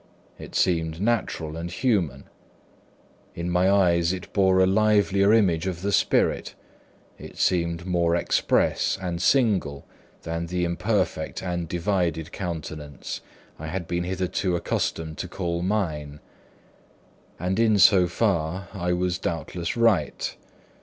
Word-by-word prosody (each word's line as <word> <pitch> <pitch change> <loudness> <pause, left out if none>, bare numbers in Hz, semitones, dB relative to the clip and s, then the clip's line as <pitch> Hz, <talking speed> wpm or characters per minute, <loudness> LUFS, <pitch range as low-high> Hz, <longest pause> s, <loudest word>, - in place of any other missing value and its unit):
It - - -10
seemed 80 -3 +1
natural 100 -8 -1
and 85 +1 -5
human. 85 - 0 1.1
In 85 +1 -3
my 90 +2 +3
eyes 85 -3 +3
it 95 0 -6
bore 95 -2 +3
a 95 - +6
livelier 100 0 +3
image 95 -6 +3
of 90 -1 -4
the 100 - 0
spirit, - - +1 0.6
it - - -11
seemed 85 -1 0
more 85 -2 +1
express 85 - +1
and 90 -2 -3
single, 95 - +2 0.4
than 85 +1 -3
the 90 0 -1
imperfect 90 -2 -1
and 85 -2 -3
divided 85 -2 -1
countenance 80 -5 -6 0.4
I 80 - -6
had 90 +2 -4
been 85 0 -1
hitherto 90 0 -1
accustomed 80 -2 -2
to 90 - -3
call 85 -1 -3
mine. 80 -7 -2 1.2
And 90 +4 -1
in 110 -2 +4
so 95 -2 +6
far 90 -2 -1
I 90 -2 -1
was 90 0 -1
doubtless 85 +2 -3
right. 110 -10 +1
90 Hz, 125 wpm, -25 LUFS, 85-95 Hz, 1.2 s, a